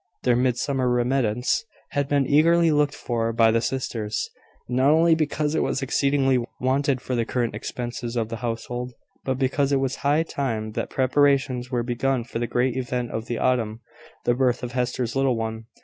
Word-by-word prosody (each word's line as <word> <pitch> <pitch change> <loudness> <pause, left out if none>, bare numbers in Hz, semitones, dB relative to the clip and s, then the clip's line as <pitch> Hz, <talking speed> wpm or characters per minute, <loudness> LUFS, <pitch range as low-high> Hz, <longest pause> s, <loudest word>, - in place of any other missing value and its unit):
Their 125 -1 +3
Midsummer 125 +1 +1
remittance 125 - +1 0.3
had 145 -1 0
been 140 -1 +2
eagerly 165 +4 +4
looked 145 -1 +2
for 115 -2 -1
by 115 0 +4
the 115 0 +2
sisters, 110 -5 -2 0.4
not 130 +3 +2
only 165 +2 +5
because 155 -1 0
it 160 - +1
was 135 - -1
exceedingly 135 -2 +2 0.2
wanted 130 0 +1
for 130 - -4
the 120 -2 +1
current 120 0 -1
expenses 120 -1 -5
of 115 -2 -1
the 115 - -4
household, 120 +2 -4 0.3
but 130 -1 -1
because 135 +1 +1
it 140 - +3
was 135 0 -1
high 145 +3 +2
time 115 -9 -3
that - - -3
preparations 135 -1 +2
were 120 -2 -1
begun 125 +1 0
for 115 0 -5
the 120 - -1
great 125 +1 0
event 125 -1 -2
of 110 +1 -4
the 120 - -2
autumn 115 -3 0 0.4
the 120 - +3
birth 125 -1 +1
of 120 - -4
Hester's 125 -1 -2
little 135 -2 +2
one. 110 0 -4
125 Hz, 180 wpm, -24 LUFS, 120-135 Hz, 0.4 s, only